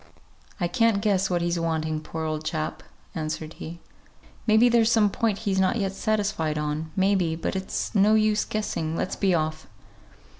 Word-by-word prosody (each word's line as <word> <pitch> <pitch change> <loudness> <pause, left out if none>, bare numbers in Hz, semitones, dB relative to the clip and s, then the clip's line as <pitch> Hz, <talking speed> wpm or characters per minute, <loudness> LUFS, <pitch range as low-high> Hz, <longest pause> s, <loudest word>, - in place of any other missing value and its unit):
"I 175 - +1
can't 225 +3 +2
guess 195 -2 +1
what 175 -2 0
he's 170 0 0
wanting, 160 -1 -1
poor 160 0 -5
old 155 0 -2
chap," 155 0 -3 0.3
answered 155 0 -4
he. 170 +2 -7 0.7
"May 215 0 +5
be 240 +2 +6
there's 235 -1 +4
some 210 -3 +4
point 220 -2 0
he's 190 -2 +1
not 190 +3 +2
yet 195 -4 -1
satisfied 200 -7 -1
on; 150 +1 -2
may 195 +1 +3
be 170 -4 +1
but 165 - -3
it's 190 0 -3
no 210 +1 +5
use 215 -1 +3
guessing; 165 -7 -2
let's 185 - -2
be 190 -3 +2
off." 155 -1 -2
185 Hz, 180 wpm, -25 LUFS, 160-210 Hz, 0.7 s, be